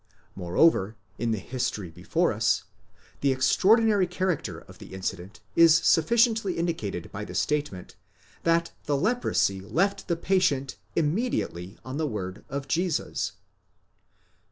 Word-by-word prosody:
Moreover, 95 - +2 0.2
in 120 - -1
the 110 - 0
history 105 -5 -3
before - - 0
us, - - +1 0.6
the 140 - +2
extraordinary 200 - +4
character 180 -2 -2
of - - -16
the - - -10
incident 95 +1 -5
is 165 -1 +7
sufficiently 220 +4 +3
indicated 160 - -3
by 100 - -5
the - - -8
statement, 145 -12 -2 0.5
that 170 0 +1
the 145 -1 +1
leprosy 215 - +1
left 190 - -1
the 170 - +1
patient 170 -8 +1 0.2
immediately 150 - -1
on 130 +2 -5
the 155 -1 0
word 95 -5 -5
of 140 0 -4
Jesus. 175 +2 -1
150 Hz, 125 wpm, -26 LUFS, -, 0.6 s, is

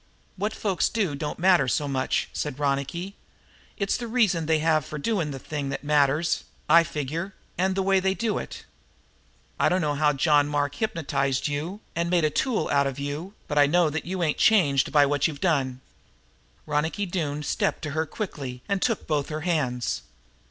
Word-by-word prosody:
"What 205 +3 -1
folks 195 -5 0
do 205 -9 0
don't 150 +1 -4
matter 175 -6 +4
so 145 +4 0
much," 135 -2 0
said 145 -3 -3
Ronicky. 145 +7 -2 0.6
"It's 200 -1 0
the 240 - -5
reasons 210 -9 +2
they 160 -1 +3
have 155 -1 +2
for 150 - -7
doing 165 -1 -1
a 135 - -5
thing 140 +1 -4
that 135 +1 -4
matters, 145 +2 +2 0.2
I 170 +2 +7
figure, 165 +4 -4 0.2
and 190 +1 +1
the 195 - +1
way 195 0 +3
they 190 +1 +1
do 215 +3 -1
it. - - -8 0.9
I - - +4
dunno 160 -5 +1
how 150 0 +2
John 145 +1 +3
Mark 145 -1 0
hypnotized 145 -9 -1
you 160 +8 -4
and 170 +1 0
made 175 -3 +3
a 155 - +1
tool 250 - 0
out 140 -1 +3
of 135 -1 -4
you, 145 +8 -5
but 150 -1 +1
I 145 - +6
do 145 - -3
know 175 -3 +4
that 160 - -3
you 185 +1 -2
ain't 155 -3 0
changed 145 -11 +4
by 145 -1 +6
what 145 0 +2
you've 150 -3 -6
done." 135 -7 0 0.8
Ronicky 160 +7 -1
Doone 150 -5 -2
stepped 150 - -1
to 150 - -3
her 160 +2 -1
quickly 135 - -6
and 200 -2 0
took 230 -4 0
both 145 -3 -1
her 155 0 -4
hands. 145 -8 -1
155 Hz, 190 wpm, -26 LUFS, 145-185 Hz, 0.9 s, I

